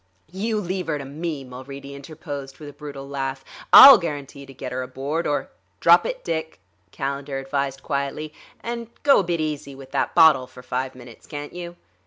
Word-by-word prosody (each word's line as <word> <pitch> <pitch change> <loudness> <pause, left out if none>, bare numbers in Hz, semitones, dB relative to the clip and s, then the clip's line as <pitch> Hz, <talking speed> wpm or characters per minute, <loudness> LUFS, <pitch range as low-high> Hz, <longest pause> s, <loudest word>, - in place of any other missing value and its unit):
"You 215 +4 -1
leave 185 -2 -3
her 155 -2 -1
to 140 - -7
me," 150 +1 -5
Mulready 135 +2 -9
interposed, 140 -2 -8
with 150 - -10
a 145 - -9
brutal 140 -2 -9
laugh. 135 -1 -4 0.3
"I'll 275 - +12
guarantee 145 -4 -6
to - - -11
get 130 0 -6
her 130 +1 -3
aboard, 135 +6 -3
or..." 145 - -2 0.3
"Drop - - +6
it, - - -5
Dick!" 160 - -4 0.3
Calendar 140 +3 -4
advised 135 0 -3
quietly. 145 +1 -3 0.3
"And 235 0 -5 0.2
go 280 -1 +6
a - - +1
bit 170 -2 -1
easy 150 -3 -4
with 135 0 -13
that - - -1
bottle 160 -6 +6
for 125 0 -14
five 130 +1 -3
minutes, 120 -2 -14
can't 145 0 -7
you?" 175 -1 -7
140 Hz, 185 wpm, -23 LUFS, 135-160 Hz, 0.3 s, I'll